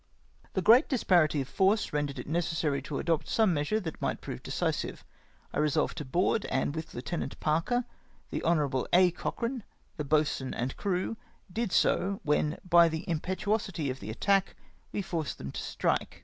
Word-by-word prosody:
" - - -31
The 190 - +1
great 235 - +6
disparity 175 - +3
of 130 - -5
force 195 +5 +2
rendered 145 -2 -1
it 125 - -5
necessary 160 -3 0
to 140 0 -5
adopt 165 -1 0
some 220 -5 +3
measure 150 +8 0
that 160 -4 -6
might - - -1
prove - - -7
decisive. - - -2 0.5
I - - -1
resolved 150 0 +1
to 150 - -5
board, 180 +9 +1
and 135 +2 0
with 160 0 -6
Lieut. 130 +8 -4
Parker, 165 +11 +1 0.5
the - - -2
Hon. 145 -6 +1
A. 180 0 +6
Cochrane, 235 +7 -3 0.3
the 150 - -2
boatswain 145 -2 +1
and 125 +2 -2
crew, 195 +3 -1 0.4
did 230 -2 -1
so, 195 +3 +2
when, 150 +1 +1
by 170 -1 +7
the 160 +1 -5
impetuosity 185 -2 -1
of 130 - -7
the 100 - -7
attack, 195 - +1 0.4
we 205 - -2
forced 165 -4 -3
them 70 - -6
to - - -5
strike. - - -1
165 Hz, 175 wpm, -30 LUFS, 150-195 Hz, 0.5 s, by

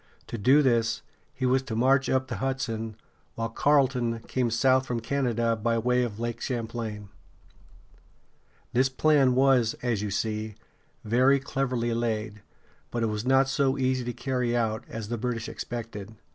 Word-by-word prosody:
To 120 - -6
do 135 +8 +5
this, 115 -3 +1 0.3
he 130 -3 -3
was 130 +1 +3
to 125 -4 -5
march 130 +3 +3
up 130 0 +1
the - - -4
Hudson, 115 -5 -3 0.4
while 115 0 -2
Carleton 125 -3 +2
came 125 0 -1
south 130 +3 +3
from 120 -1 -1
Canada 115 -2 0
by 115 +1 0
way 125 +2 +2
of 115 -3 -3
Lake 120 0 -3
Champlain. 115 -4 -4 1.6
This 130 +2 +3
plan 135 -2 +3
was, 130 -4 +3
as 115 -5 0
you 105 - -2
see, 110 +1 -2 0.5
very 130 +5 +4
cleverly 130 -3 -1
laid; 110 -2 -2 0.5
but 120 -1 -2
it 115 - +1
was 105 +3 -4
not 135 +1 +4
so 135 0 +1
easy 130 -1 0
to 120 - -2
carry 125 -2 -1
out 110 -2 -1
as 110 -2 -6
the 120 -1 -3
British 120 0 -2
expected. 115 -6 -6
120 Hz, 160 wpm, -27 LUFS, 115-130 Hz, 1.6 s, do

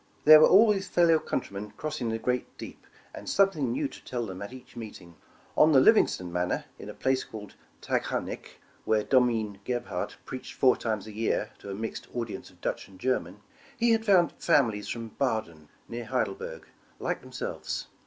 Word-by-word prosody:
There 155 +1 +11
were 155 - +7
always 200 -1 +5
fellow 170 -3 +4
countrymen 105 -7 -4
crossing 140 -6 -3
the 115 - -1
great 125 +2 -2
deep, - - -10 0.3
and - - -7
something 170 -10 +2
nev/ 135 +3 -1
to - - -13
tell 120 -2 -3
them 95 -2 -7
at 100 - -6
each 130 -1 -13
meeting. 105 -7 -9 0.4
On 155 +1 +6
the 135 - +8
Livingston 110 - +4
Manor, 90 0 -1
in - - -8
a - - -8
place 130 0 +1
called 105 -2 -10 0.3
Taghkanic, - - -3
— - - -32
where 110 -1 +2
Domine 115 -6 +2
Gebhard 120 +1 -3
preached 130 - -7
four 130 -1 +5
times 110 -3 -3
a 110 - -9
year, 110 +2 -1
to - - -10
a 95 - -4
mixed 110 +2 -5
audience 115 -3 -4
of - - -23
Dutch - - -3
and 95 -1 -17
Ger 130 +3 +2
man, 90 +4 -13 0.2
— - - -25
he 235 0 +3
had 225 -1 +3
found 190 -5 +4
families 115 -11 +2
from 115 -1 -5
Baden, 110 - -2 0.2
near 120 0 -6
Heidel 125 +3 0
berg, 485 +2 -8 0.3
like - - -2
themselves. - - -5
120 Hz, 190 wpm, -28 LUFS, 105-155 Hz, 0.4 s, There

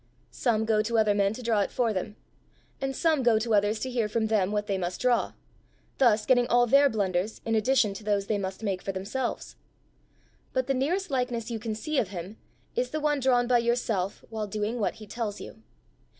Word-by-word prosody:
"Some 220 -3 0
go 220 -1 +3
to 230 +2 -1
other 215 -2 +4
men 200 -1 +2
to 250 - -8
draw 225 -2 +2
it 200 - +1
for 235 -3 0
them; 205 +2 -4 0.7
and 270 0 -2
some 320 -2 +2
go 235 -3 +4
to 225 +1 -1
others 205 +1 +2
to 260 - -2
hear 235 -4 0
from 220 +1 0
them 205 -3 +2
what 210 0 -1
they 195 -2 -1
must 175 0 -3
draw 250 -1 +1 0.7
thus 225 -5 +4
getting 245 -2 +4
all 245 0 +4
their 275 +4 +5
blunders 200 -2 -1
in 225 - 0
addition 220 -1 +3
to 205 - -9
those 205 -1 0
they 205 0 -1
must 190 +2 -5
make 195 -3 -1
for 195 - -3
themselves. 210 +7 -4 1.0
But 260 -1 +1
the 270 - 0
nearest 335 +7 -1
likeness 245 -3 -1
you 225 - -3
can 220 0 -4
see 300 +6 -1
of 215 - 0
him, 185 +3 -7 0.4
is - - 0
the 310 - -3
one 295 -1 +1
drawn 250 -2 +3
by 245 0 +3
yourself 230 -5 -1
while 215 -1 -3
doing 215 +3 -2
what 210 - 0
he 215 - -11
tells 215 -1 -4
you. 220 - -10
225 Hz, 215 wpm, -27 LUFS, 205-250 Hz, 1.0 s, their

